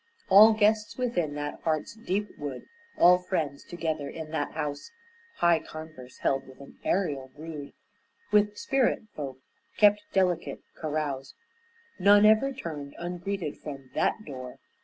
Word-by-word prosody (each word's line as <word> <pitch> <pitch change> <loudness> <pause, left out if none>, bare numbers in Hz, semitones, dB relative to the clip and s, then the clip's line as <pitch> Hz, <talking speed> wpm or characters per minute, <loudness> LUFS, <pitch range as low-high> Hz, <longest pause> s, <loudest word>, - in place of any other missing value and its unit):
All 210 +3 +9
guests 215 0 +2
within 180 - -1
that 145 0 -5
heart's 155 -2 -1
deep 210 -2 -2
wood, 140 -4 -5 0.3
All 180 +1 +7
friends 160 -6 -2
together 160 -4 -3
in 160 -1 -7
that 160 - -2
house, 150 - -4 0.5
High 170 -1 +4
converse 155 -6 -10
held 135 -1 0
with 130 -1 -15
an 140 - -14
ærial 140 -9 -1
brood, 150 -2 -8 0.6
With 210 0 +3
spirit 270 -4 +1
folk 135 -3 -5 0.4
kept 205 0 +6
delicate 185 -3 0
carouse; 145 -4 -3 0.6
None 205 +2 +7
ever 220 +6 +5
turned 155 - -7
ungreeted 175 -1 -4
from 135 -3 -8
that 215 - 0
door. 130 -2 -8
160 Hz, 135 wpm, -28 LUFS, 145-205 Hz, 0.6 s, All